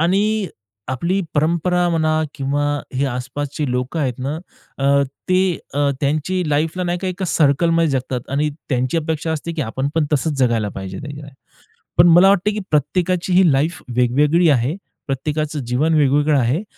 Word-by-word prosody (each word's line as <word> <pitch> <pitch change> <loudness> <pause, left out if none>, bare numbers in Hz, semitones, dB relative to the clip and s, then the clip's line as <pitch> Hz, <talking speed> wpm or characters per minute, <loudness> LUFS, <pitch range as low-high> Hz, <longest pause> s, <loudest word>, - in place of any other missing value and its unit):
आणि 200 +4 +1 0.4
आपली 170 +9 0
परंपरा 170 +3 +1
म्हणा 155 -1 +1
किंवा 140 +1 -1 0.3
हे 135 +2 +1
आसपासची 135 +2 -4
लोकं 125 +6 -2
आहेत 130 -4 -2
ना, 140 +5 -3 0.4
अ, 140 +1 +3 0.3
ते 185 -1 +2 0.2
अ, 145 0 +2
त्यांची 155 +6 0
लाईफला 160 +5 0
नाही 175 0 -1
का 190 - -4
एका 185 +1 -4
सर्कलमध्ये 165 +2 +2
जगतात 130 -2 -3
आणि 145 +2 +1 0.2
त्यांची 130 +5 0
अपेक्षा 160 0 -2
असते, 160 +2 -4
की 160 -3 -2
आपण 130 +4 -2
पण 155 -2 +2
तसच 150 0 0
जगायला 115 -5 +1
पाहिजे, 95 0 -6
नाही 145 0 -7
का. 145 - -10 0.7
पण 170 +1 +7
मला 175 +3 +7
वाटतं, 200 +1 +2
की 215 - -3
प्रत्येकाची 175 +5 0
ही 180 -3 +5
लाईफ 155 +6 0 0.2
वेगवेगळी 150 +7 +3
आहे, 130 +3 +2 0.3
प्रत्येकाचं 150 +2 -2
जीवन 135 +7 +1
वेगवेगळं 145 0 +3
आहे 130 - 0
150 Hz, 160 wpm, -19 LUFS, 135-170 Hz, 0.7 s, पण